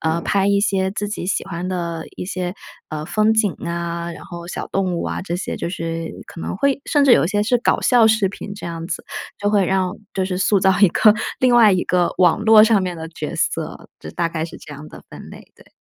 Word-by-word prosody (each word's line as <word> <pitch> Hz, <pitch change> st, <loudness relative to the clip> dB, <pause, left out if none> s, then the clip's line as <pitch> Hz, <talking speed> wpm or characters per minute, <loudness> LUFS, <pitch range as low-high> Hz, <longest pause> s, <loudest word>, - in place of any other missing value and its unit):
呃， 160 Hz, +1 st, 0 dB
拍 195 Hz, +2 st, +1 dB
一 200 Hz, 0 st, +3 dB
些 190 Hz, -2 st, +1 dB
自 205 Hz, +1 st, -3 dB
己 195 Hz, -3 st, -5 dB
喜 -, -, -1 dB
欢 175 Hz, +2 st, -5 dB
的 170 Hz, -3 st, -3 dB
一 -, -, -5 dB
些， 180 Hz, -1 st, -4 dB, 0.3 s
呃， 155 Hz, 0 st, -5 dB
风 215 Hz, +2 st, +2 dB
景 210 Hz, -5 st, +2 dB
啊， 170 Hz, 0 st, -3 dB
然 -, -, -11 dB
后 170 Hz, -1 st, -9 dB
小 -, -, -5 dB
动 190 Hz, -2 st, -1 dB
物 170 Hz, -, -2 dB
啊 -, -, -3 dB
这 175 Hz, -2 st, -3 dB
些， 180 Hz, -, -4 dB
就 -, -, -3 dB
是 165 Hz, -1 st, -4 dB, 0.2 s
可 165 Hz, -, -10 dB
能 -, -, -4 dB
会 280 Hz, +4 st, +1 dB
甚 290 Hz, -2 st, +3 dB
至 260 Hz, -, +6 dB
有 -, -, +5 dB
一 -, -, -1 dB
些 205 Hz, +1 st, +1 dB
是 245 Hz, +3 st, +2 dB
搞 240 Hz, -, +1 dB
笑 240 Hz, -3 st, +5 dB
视 215 Hz, -3 st, +3 dB
频 200 Hz, +1 st, -8 dB
这 205 Hz, -, -8 dB
样 165 Hz, -1 st, -5 dB
子， -, -, -4 dB, 0.4 s
就 205 Hz, -, 0 dB
会 205 Hz, -2 st, +3 dB
让 190 Hz, 0 st, 0 dB, 0.2 s
就 190 Hz, -1 st, 0 dB
是 185 Hz, -, -3 dB
塑 195 Hz, 0 st, +2 dB
造 190 Hz, 0 st, +3 dB
一 200 Hz, -, +7 dB
个 210 Hz, +5 st, +5 dB, 0.3 s
另 250 Hz, -1 st, +4 dB
外 220 Hz, -4 st, +7 dB
一 185 Hz, -, +1 dB
个 180 Hz, -1 st, +1 dB
网 185 Hz, +3 st, +4 dB
络 220 Hz, 0 st, +7 dB
上 215 Hz, -3 st, +3 dB
面 180 Hz, -1 st, -3 dB
的 160 Hz, 0 st, -7 dB
角 160 Hz, -, -6 dB
色。 -, -, -3 dB
就 75 Hz, -, -8 dB
大 170 Hz, -, -1 dB
概 160 Hz, -1 st, -3 dB
是 165 Hz, -, -9 dB
这 150 Hz, -, -11 dB
样 150 Hz, +2 st, -10 dB
的 -, -, -13 dB
分 -, -, -11 dB
类， -, -, -14 dB
对。 -, -, -21 dB
185 Hz, 270 characters per minute, -20 LUFS, 170-210 Hz, 0.4 s, 一